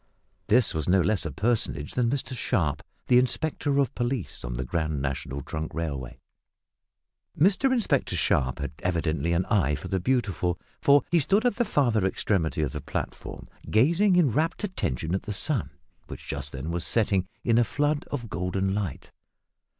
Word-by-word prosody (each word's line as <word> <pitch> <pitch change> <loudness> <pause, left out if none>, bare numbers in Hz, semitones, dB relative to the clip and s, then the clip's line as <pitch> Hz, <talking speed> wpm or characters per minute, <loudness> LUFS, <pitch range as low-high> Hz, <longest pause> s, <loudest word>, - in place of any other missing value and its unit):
This 120 +1 +4
was 80 -1 -2
no 95 +1 +5
less 95 -2 +1
a - - -5
personage 95 - -1
than 120 -2 +1
Mr 130 0 -2
Sharp, 80 - 0 0.3
the 125 - +6
inspector 140 +2 0
of 140 -4 +2
police 120 -3 -3
on - - -4
the 65 +1 -3
Grand 80 0 -1
National 70 0 -3
Trunk 80 +3 -5
Railway. 70 -6 -4 1.2
Mr 200 - +4
Inspector 240 -4 +1
Sharp 65 -1 +1
had 70 0 -4
evidently 85 -3 0
an 85 +2 +1
eye 80 - +2
for - - -7
the 95 - 0
beautiful, 95 -6 0 0.2
for 140 -1 +5
he 170 - +5
stood 195 - +2
at 245 -4 +2
the 240 - +2
farther 120 - +2
extremity 95 -4 0
of 70 - -1
the 75 - -5
platform - - -5 0.2
gazing 170 - +4
in 165 -8 +4
rapt 160 - 0
attention 85 - -2
at 95 - 0
the 105 - -5
sun, 125 - -1 0.4
which - - -9
just 70 0 -3
then 70 +5 -5
was 85 0 -2
setting 100 -5 +1 0.2
in 115 -1 +3
a - - +5
flood 145 +5 0
of 125 -5 -4
golden 95 0 -1
light. 100 -9 -4
100 Hz, 175 wpm, -26 LUFS, -, 1.2 s, the